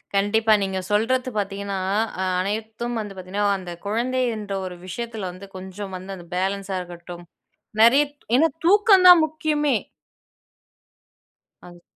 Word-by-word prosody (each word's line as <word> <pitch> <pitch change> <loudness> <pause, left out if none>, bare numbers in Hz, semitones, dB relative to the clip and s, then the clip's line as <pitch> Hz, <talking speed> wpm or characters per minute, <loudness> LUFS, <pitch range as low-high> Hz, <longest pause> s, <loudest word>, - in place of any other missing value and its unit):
கண்டிப்பா 215 +2 +3
நீங்க 190 -1 -2
சொல்றது 250 +5 +1
பாத்தீங்கன்னா, 200 -1 -3 0.6
அனைத்தும் 220 +5 -3
வந்து 210 -2 -5
பாத்தீங்கன்னா, 190 +2 -3
அந்த 180 -2 -8
குழந்தை 240 +5 0
என்ற 205 -2 -6
ஒரு 180 -1 -6
விஷயத்தில 220 +1 -5
வந்து, 185 +2 -11
கொஞ்சம் 190 +1 -8
வந்து 185 +2 -7
அந்த 175 -2 -12
பேலன்ஸா 195 +1 -2
இருக்கட்டும். 175 0 -10 0.6
நெறைய 255 +6 +7 0.3
ஏன்னா 315 +5 +5 0.2
தூக்கந்தான் 375 -3 +7
முக்கியமே. 300 -3 0 1.9
அது. 175 -1 -14
205 Hz, 115 wpm, -23 LUFS, 190-240 Hz, 1.9 s, நெறைய